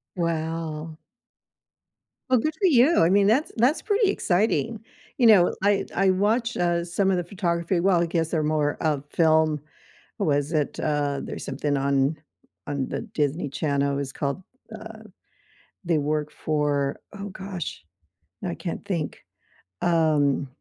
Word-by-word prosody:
Wow. 160 -2 -3 1.3
well, 255 - +5
good 310 +6 -1
for 385 - +1
you, 290 0 +5
I 165 - +5
mean, 200 +1 +4
that's 255 +9 +2
that's 250 +8 +2
pretty 420 -1 +2
exciting. 220 - 0 0.4
You 245 - +5
know, 195 -6 +6
I 200 0 +3
I 195 +1 +3
watch, 220 +5 +1
uh, 175 -1 +1
some 190 +3 0
of 190 - +2
the 175 - -1
photography 170 -1 -1
well, 180 -1 +3
I 175 - +1
guess 165 -1 -1
they're 160 -3 0
more 150 -1 0
of 150 -3 0
film 160 -2 +3 0.6
what - - 0
was 145 +1 +1
it, 150 -3 -1
uh, 145 -2 0
there's - - -6
something 145 +1 -1
on 140 +2 +1 0.5
on 140 -2 -2
the - - -3
Disney 150 +1 0
Channel, 140 -1 0
it - - -2
was 140 -1 -3
called, 140 +6 -3 0.4
uh 220 0 -10 0.8
they 165 -3 +2
work 150 +1 -1
for 145 -2 -1 0.2
oh 200 +1 -5
gosh, 190 - -6 0.6
I - - -2
can't - - -5
think. - - -3 0.6
Um, 155 -5 +2
165 Hz, 150 wpm, -25 LUFS, 145-195 Hz, 1.3 s, know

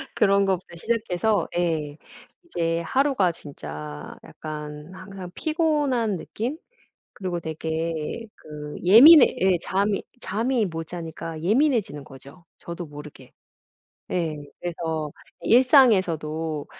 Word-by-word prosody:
그런 200 -2 +3
것부터 185 -2 -2
시작해서 215 +1 0
예 155 -4 -1 0.5
이제 165 - -1
하루가 260 - +2
진짜 75 - -9
약간 150 +1 -8
항상 185 -1 -9
피곤한 295 - 0
느낌? 240 - -4 0.6
그리고 180 -3 -4
되게 160 +5 -4
그 150 -1 -9
예민해 255 - +9
예 185 -1 +3
잠이 200 +3 0 0.2
잠이 230 +2 0
못 165 -2 -5
자니까 165 -1 -7
예민해지는 220 - +1
거죠, 140 +4 -14
저도 170 0 -7
모르게. 145 -3 -12 0.8
예. 165 -4 -1 0.2
그래서 160 -3 -3 0.3
일상에서도 175 - +3
175 Hz, 230 characters per minute, -24 LUFS, 155-215 Hz, 0.8 s, 예민해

